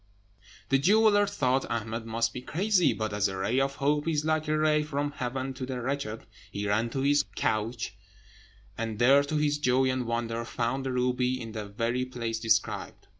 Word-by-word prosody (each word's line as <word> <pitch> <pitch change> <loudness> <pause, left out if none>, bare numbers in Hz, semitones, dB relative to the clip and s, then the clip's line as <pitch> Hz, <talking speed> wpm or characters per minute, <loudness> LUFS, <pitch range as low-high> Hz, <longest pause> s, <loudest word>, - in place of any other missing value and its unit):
The 135 - +4
jeweller 205 +5 +4
thought 135 -9 0
Ahmed 115 0 -3
must 115 +1 0
be 125 - -5
crazy; 185 +5 +2
but 110 -1 -3
as 105 0 +2
a 95 -1 -5
ray 115 +7 +1
of 135 0 0
hope 145 +2 0
is 155 -2 0
like 155 0 0
a 155 0 +1
ray 155 0 +3
from 145 -1 -2
heaven 130 -1 -3
to 130 - -7
the 130 -1 -3
wretched, 125 -3 -3 0.3
he 100 0 -3
ran 110 +3 +1
to 135 +3 -3
his 145 +1 +3
couch, 110 +2 -1 0.8
and 115 -2 -4
there, 135 +5 +6
to 145 +2 -2
his 150 -1 +1
joy 130 -1 +3
and 130 -2 -2
wonder, 115 0 -2
found 120 +3 -2
the - - -1
ruby 125 0 0
in 115 -2 -7
the 110 -2 -5
very 115 +5 -1
place 115 -3 -4
described. 110 0 -1
130 Hz, 190 wpm, -28 LUFS, 115-145 Hz, 0.8 s, there